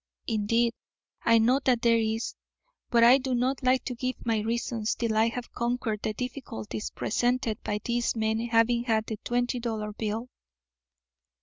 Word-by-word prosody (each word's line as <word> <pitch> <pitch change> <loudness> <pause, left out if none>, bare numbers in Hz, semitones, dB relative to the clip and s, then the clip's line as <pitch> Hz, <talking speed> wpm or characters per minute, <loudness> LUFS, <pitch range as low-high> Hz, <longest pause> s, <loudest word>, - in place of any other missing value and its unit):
Indeed, 230 +2 +1 0.5
I 230 0 +5
know 240 +4 +4
that 245 -3 +2
there 230 -1 +5
is, 225 +1 -1 0.6
but 235 -1 +4
I 250 +3 +8
do 260 -1 -1
not 255 +3 0
like 255 0 +2
to 255 - -3
give 255 +1 -2
my 225 -2 +1
reasons 225 0 -1
till 230 -2 -1
I 220 +1 +4
have 240 +1 -5
conquered 235 -3 -1
the 215 - -2
difficulties 205 - -5
presented 240 -1 -1
by 210 0 -3
these 240 0 0
men 220 0 0
having 235 +1 +3
had 220 -2 +1
the 220 - -4
twenty 245 +1 0
dollar 220 -3 -3
bill." 220 +3 -3
230 Hz, 165 wpm, -28 LUFS, 220-245 Hz, 0.6 s, I